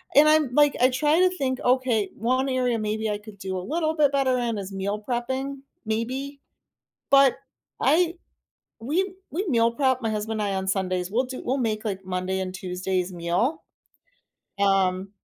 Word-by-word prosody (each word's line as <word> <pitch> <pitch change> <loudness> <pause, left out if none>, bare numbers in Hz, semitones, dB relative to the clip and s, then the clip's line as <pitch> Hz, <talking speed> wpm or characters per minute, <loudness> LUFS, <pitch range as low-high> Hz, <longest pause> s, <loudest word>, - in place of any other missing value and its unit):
and 295 +2 +8
I'm 305 -5 +3
like, 295 -1 +5
I 255 - +6
try 295 +5 +2
to 370 0 +5
think, 260 -3 -1
"Okay, 245 -5 +2
one 255 +4 0
area 250 -3 +1
maybe 215 +1 -2
I - - 0
could 210 - -20
could 210 -1 -12
do 190 -1 -4
a - - -2
little 320 0 0
bit 295 -3 +3
better 270 -2 +2
in 235 -2 -1
is 195 -1 -6
meal 200 +2 -3
prepping, 260 +3 -2 0.3
maybe." 260 +6 -3 0.7
But, 275 -2 +6 0.4
I 340 +1 +3 0.7
we 355 - -1 0.2
we 375 +6 -2
meal 230 -5 +3
prep, 260 0 +1
my 225 - -1
husband 215 +1 -2
and 205 -1 0
I, - - -1
on 190 0 -3
Sundays 185 -2 -1
we'll 240 +5 +2
do 255 0 -7
we'll 260 +3 0
make, 220 -3 -1
like, 195 -2 -3
Monday 185 +1 -2
and 185 -1 -4
Tuesday's 185 0 -2
meal, 180 - -1 1.0
um, 195 -1 +2
235 Hz, 180 wpm, -25 LUFS, 195-275 Hz, 1.0 s, and